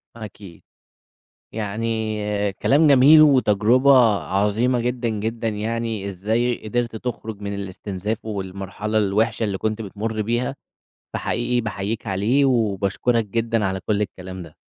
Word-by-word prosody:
أكيد. 105 -5 -11 0.9
يعني 110 +1 -2 0.4
كلام 145 +9 +3
جميل 145 +3 +7
وتجربة 130 -2 +4 0.3
عظيمة 105 +7 +1
جدًا، 120 0 -1
جدًا 110 +2 -3
يعني 110 -1 -3
إزاي 110 +5 -1
قدرت 120 +1 -1
تخرُج 110 -3 -5
من 100 0 -4
الاستنزاف 100 +2 -5
والمرحلة 100 +1 -4
الوِحشة 110 +2 +1
اللي 100 -3 -1
كنت 110 +2 -2
بتمُر 110 +2 -4
بيها، 120 +5 -1 0.6
فحقيقي 120 +1 -1
باحييك 110 0 -4
عليه 110 +9 +2
وباشكُرك 115 -1 +1
جدًا 115 +1 -1
على 95 0 -2
كل 105 -1 +1
الكلام 95 -2 -6
ده. 80 -3 -12
110 Hz, 120 wpm, -22 LUFS, 100-120 Hz, 0.9 s, جميل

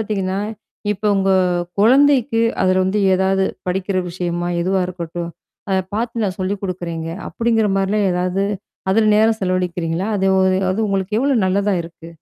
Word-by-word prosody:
பாத்தீங்கன்னா, 195 -2 -2 0.5
இப்ப 210 - -10
உங்க 195 0 +1 0.5
குழந்தைக்கு 255 0 +4 0.2
அதுல 185 0 +3
வந்து 195 +3 0 0.2
எதாவது 190 +1 +2 0.2
படிக்கிற 190 +1 -1
விஷயமா? 175 0 -3
எதுவா 190 +1 +1
இருக்கட்டும்? 170 -1 -5 0.4
அத 190 - +2 0.2
பாத்து 230 0 -2
நான் 190 0 -3
சொல்லிக் 195 +2 -2
குடுக்குறேங்க! 170 -3 -4 0.2
அப்டிங்கிற 225 -2 +1
மாரிலாம் 200 +1 +1
எதாவது 180 +2 0 0.5
அதுல 215 +2 +3
நேரம் 220 0 +3
செலவழிக்கிறீங்களா? 180 0 -1
அது 195 0 0
ஒ - - +4 0.3
அது 205 - -2
உங்களுக்கு 195 +2 -1
எவ்ளோ 275 0 +2
நல்லதா 200 +2 +1
இருக்கு. 165 0 -12
190 Hz, 140 wpm, -19 LUFS, 180-215 Hz, 0.5 s, குழந்தைக்கு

